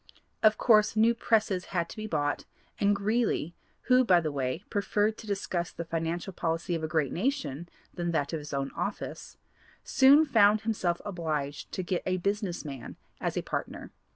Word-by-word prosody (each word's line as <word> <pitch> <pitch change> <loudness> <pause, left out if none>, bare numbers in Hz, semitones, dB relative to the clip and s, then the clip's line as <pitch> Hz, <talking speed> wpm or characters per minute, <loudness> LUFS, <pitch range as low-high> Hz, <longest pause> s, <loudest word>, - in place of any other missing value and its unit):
Of 215 0 +5
course 215 -2 +4
new 225 +2 +5
presses 215 -5 +1
had 170 -3 -2
to - - -9
be 215 0 -5
bought 145 -6 -1 0.3
and 205 0 +3
Greeley, 205 -5 0 0.3
who 255 0 +4
by 185 -7 +5
the 155 -3 -2
way 135 +4 -2
preferred 205 +1 +1
to 220 - -10
discuss 190 -3 -2
the 170 - -6
financial 165 +3 -3
policy 165 +2 -2
of 165 -1 -2
a - - 0
great 155 -4 0
nation 180 - -2 0.2
than 175 -1 -2
that 155 -2 -1
of 160 - -1
his 150 0 -9
own 140 -1 -2
office, - - -5 0.5
soon 280 +4 +6
found 215 -6 +4
himself 190 -6 -1
obliged 155 -7 -3
to 185 - -2
get 180 0 -1
a 185 0 +1
business 200 -2 -2
man 135 -4 -7 0.2
as - - -2
a - - -1
partner. - - -5
180 Hz, 180 wpm, -29 LUFS, 165-215 Hz, 0.5 s, soon